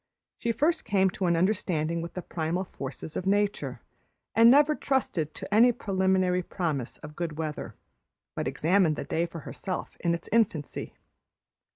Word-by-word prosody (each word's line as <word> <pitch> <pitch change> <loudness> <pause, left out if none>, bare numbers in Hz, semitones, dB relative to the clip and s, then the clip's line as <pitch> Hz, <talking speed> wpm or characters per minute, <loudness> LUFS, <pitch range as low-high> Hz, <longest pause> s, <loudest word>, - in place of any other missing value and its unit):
She 235 - 0
first 305 +8 +1
came 190 -2 +2
to 185 0 -2
an 170 -1 +3
understanding 170 -4 0
with 170 - -7
the 180 - -4
primal 165 +3 -2
forces 140 -2 -7
of 185 - -3
nature, 205 +1 0 0.5
and 230 +1 +7
never 290 +4 +6
trusted 245 - -1
to - - -5
any 235 +3 +7
preliminary 190 -4 +1
promise 155 -9 -3
of 150 0 -9
good 165 -2 -4
weather, 155 -2 -4 0.6
but - - -2
examined 170 -1 +2
the - - -4
day 170 +1 -1
for 165 -1 -8
herself 185 +4 -5
in 170 -1 +1
its 170 - -9
infancy. 195 -10 0
180 Hz, 160 wpm, -28 LUFS, 160-205 Hz, 0.6 s, and